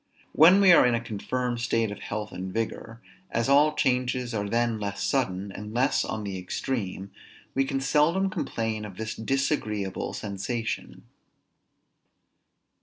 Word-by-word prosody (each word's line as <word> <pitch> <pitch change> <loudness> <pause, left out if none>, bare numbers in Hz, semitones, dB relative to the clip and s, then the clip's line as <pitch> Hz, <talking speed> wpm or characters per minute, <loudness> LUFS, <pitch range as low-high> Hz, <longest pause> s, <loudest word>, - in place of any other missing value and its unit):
When 175 +5 +7
we 190 -2 +7
are 170 - +8
in 125 -1 +3
a - - 0
confirmed 120 +2 -3
state 115 -2 +1
of 105 - -7
health 105 0 -5
and 95 +1 -5
vigor, 115 +1 -4 0.3
as 115 +1 0
all 150 +2 +5
changes 125 -2 0
are 105 -2 -2
then 115 0 +1
less 100 -1 -3
sudden, 100 -7 -1
and 105 +3 -8
less 130 +4 +2
on 110 - -4
the 95 -2 -4
extreme, 95 0 -4 0.4
we 135 0 +2
can 135 0 -1
seldom 165 +8 +2
complain 110 -8 -2
of 100 -3 -9
this 110 0 -4
disagreeable 110 -6 -1
sensation. 110 +3 -4
115 Hz, 145 wpm, -27 LUFS, 105-135 Hz, 0.4 s, are